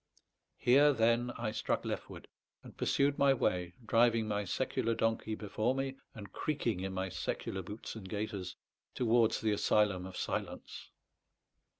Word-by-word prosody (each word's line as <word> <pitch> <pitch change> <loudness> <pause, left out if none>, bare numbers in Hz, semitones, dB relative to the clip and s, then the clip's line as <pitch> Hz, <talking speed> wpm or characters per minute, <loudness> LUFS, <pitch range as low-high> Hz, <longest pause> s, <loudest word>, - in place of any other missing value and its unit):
Here, 145 +4 +5
then, 115 0 +2
I 115 -2 -2
struck 110 - -1
leftward, - - -5 0.4
and - - -12
pursued 140 0 +1
my 140 -1 +5
way, 90 -6 0
driving 115 0 +3
my 105 -1 -1
secular 115 +4 -1
donkey 115 -1 0
before 110 +4 -1
me, 135 0 -2 0.2
and 100 -4 -9
creaking 120 - -1
in 95 +1 -3
my 95 0 -2
secular 90 +2 -3
boots 105 +5 -7
and 100 -4 -9
gaiters, 100 -3 -4 0.4
towards 115 -2 +3
the 110 - +1
asylum 105 -2 +2
of 95 - -9
silence. - - -4
110 Hz, 140 wpm, -33 LUFS, 95-120 Hz, 0.4 s, Here